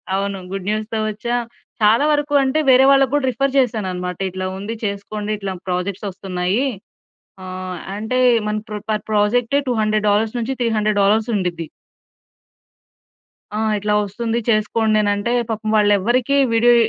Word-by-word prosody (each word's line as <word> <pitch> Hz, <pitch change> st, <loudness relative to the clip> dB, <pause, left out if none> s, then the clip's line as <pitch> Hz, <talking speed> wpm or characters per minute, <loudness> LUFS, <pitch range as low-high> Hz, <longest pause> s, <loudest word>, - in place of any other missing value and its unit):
అవును. 195 Hz, 0 st, -2 dB
గుడ్ 195 Hz, -1 st, -5 dB
న్యూస్‌తో 215 Hz, +1 st, -2 dB
వచ్చా. 230 Hz, +3 st, -3 dB, 0.5 s
చాలా 220 Hz, +6 st, +4 dB
వరకు 295 Hz, 0 st, 0 dB
అంటే, 265 Hz, +3 st, +1 dB
వేరే 260 Hz, +1 st, +7 dB
వాళ్ళకి 270 Hz, -2 st, +4 dB
కూడా 290 Hz, -2 st, +2 dB
రిఫర్ 275 Hz, +3 st, -1 dB
చేశాను 220 Hz, -6 st, 0 dB
అన్నమాట. 180 Hz, -1 st, -4 dB
ఇట్లా 185 Hz, +1 st, -5 dB
ఉంది 205 Hz, +4 st, -5 dB
చేసుకోండి. 205 Hz, +1 st, -4 dB
ఇట్లా 200 Hz, -2 st, -4 dB, 0.2 s
ప్రాజెక్ట్స్ 185 Hz, +3 st, -2 dB
వస్తున్నాయి. 190 Hz, +4 st, -2 dB, 0.8 s
ఆహ్, 185 Hz, 0 st, -6 dB, 0.2 s
అంటే 220 Hz, +5 st, -2 dB, 0.3 s
మన 210 Hz, 0 st, -1 dB
ప్ర 210 Hz, -, -5 dB
పర్ 215 Hz, -1 st, -1 dB
ప్రాజె‌క్టే 230 Hz, +6 st, +2 dB
200 215 Hz, -3 st, +1 dB
డాలర్స్ 215 Hz, +3 st, +1 dB
నుంచి 235 Hz, +3 st, -2 dB
300 215 Hz, -3 st, +1 dB
డాలర్స్ 210 Hz, +2 st, +3 dB
ఉండిద్ది. 175 Hz, -4 st, -2 dB, 1.9 s
ఆ! -, -, -1 dB, 0.2 s
ఇట్లా 210 Hz, +1 st, -1 dB
వస్తుంది. 225 Hz, +3 st, -2 dB
చేసుకోండి, 215 Hz, 0 st, +2 dB
అనంటే, 205 Hz, +2 st, 0 dB, 0.2 s
పాపం 215 Hz, -1 st, -3 dB
వాళ్ళెవ్వరికి 220 Hz, +6 st, +2 dB, 0.2 s
వీడియో 240 Hz, +1 st, +5 dB
215 Hz, 140 wpm, -20 LUFS, 200-235 Hz, 1.9 s, వేరే